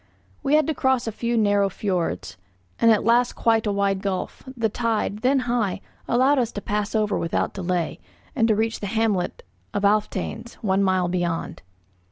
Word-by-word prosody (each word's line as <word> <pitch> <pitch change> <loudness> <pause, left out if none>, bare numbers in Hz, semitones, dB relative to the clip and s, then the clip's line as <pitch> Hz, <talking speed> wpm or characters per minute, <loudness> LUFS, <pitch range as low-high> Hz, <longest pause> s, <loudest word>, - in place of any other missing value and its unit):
We 280 - +2
had 310 - +4
to 315 - 0
cross 260 -3 +1
a 225 - -2
few 235 +2 -1
narrow 205 -2 +3
fiords, 170 - -2 0.4
and 230 - +5
at 220 -2 +4
last 240 +2 +3
quite 225 -1 +2
a - - +2
wide 200 -1 0
gulf; 190 -2 -3 0.2
the 225 -1 +2
tide, 220 -2 -1
then 260 +3 +2
high, 235 -6 -1 0.3
allowed 260 +4 +3
us 235 -2 0
to - - -3
pass 210 +1 -2
over 210 -1 +1
without 165 - -1
delay, 180 -3 -2 0.4
and 225 -4 +3
to 220 - +3
reach 225 +1 -1
the 205 - -4
hamlet 215 -3 0 0.3
of 205 - -1
Alftanes, 215 +2 -1
one 195 -1 +2
mile 185 -2 +2
beyond. 175 -2 -2
210 Hz, 180 wpm, -24 LUFS, 195-235 Hz, 0.4 s, and